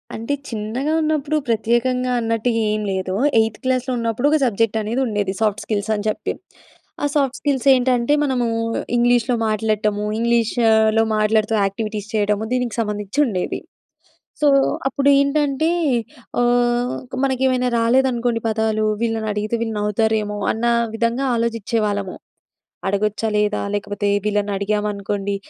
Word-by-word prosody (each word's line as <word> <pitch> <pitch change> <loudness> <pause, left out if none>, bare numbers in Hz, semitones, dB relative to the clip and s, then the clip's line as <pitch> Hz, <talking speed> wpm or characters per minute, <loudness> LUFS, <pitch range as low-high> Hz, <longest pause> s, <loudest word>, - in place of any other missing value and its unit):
అంటే 230 +6 -3 0.2
చిన్నగా 230 +7 -2
ఉన్నప్పుడు 310 -1 0
ప్రత్యేకంగా 240 +3 +1
అన్నట్టుగా 230 0 0
ఏం 215 - -1
లేదు. 185 -1 -2 0.3
ఎయిత్ 220 -1 0
క్లాస్‌లో 255 0 0
ఉన్నప్పుడు 230 +3 0
ఒక 310 - +4
సబ్జెక్ట్ 225 -1 +1
అనేది 225 +5 -1
ఉండేది. 205 -3 -1
సాఫ్ట్ 215 -1 +1
స్కిల్స్ 210 -1 -2
అని 205 0 -4
చెప్పి. 215 - -3 0.7
ఆ! - - +3
సాఫ్ట్ 275 -3 +1
స్కిల్స్ 280 -3 0
ఏంటంటే 250 +1 +2
మనము 255 -4 0 0.5
ఇంగ్లీష్‌లో 240 0 +3
మాట్లాడటము 215 -1 0
ఇంగ్లీష్‌లో 225 -1 +3
మాట్లాడుతూ 215 +1 +2
యాక్టివిటీస్ 210 +1 -4
చేయడము 210 0 +1
దీనికి 250 -3 -1
సంబంధించి 210 +2 -3
ఉండేది. 190 -8 -2 0.8
సో 295 - +5 0.4
అప్పుడు 275 +1 0
ఏంటంటే 280 +1 +1 0.7
ఆహ్, 245 0 +2
ఒక 260 - -8
మనకేమైనా 260 -1 +1
రాలేదనుకోండి 240 0 +2
పదాలు. 220 0 0 0.2
వీళ్ళని 225 -1 -1
అడిగితే 210 +2 -2
వీళ్ళు 225 -2 -3
నవ్వుతారేమో 210 0 0
అన్న 225 +2 -4 0.3
విధంగా 235 +4 0
ఆలోచించే 230 -1 -1
వాళ్ళము. 200 -2 -2 0.7
అడగొచ్చా? 210 +2 0
లేదా? 210 0 +1
లేకపోతే 205 0 -2 0.2
వీళ్ళని 205 -1 0
అడిగామనుకోండి 200 0 -2
225 Hz, 125 wpm, -20 LUFS, 210-245 Hz, 0.8 s, సో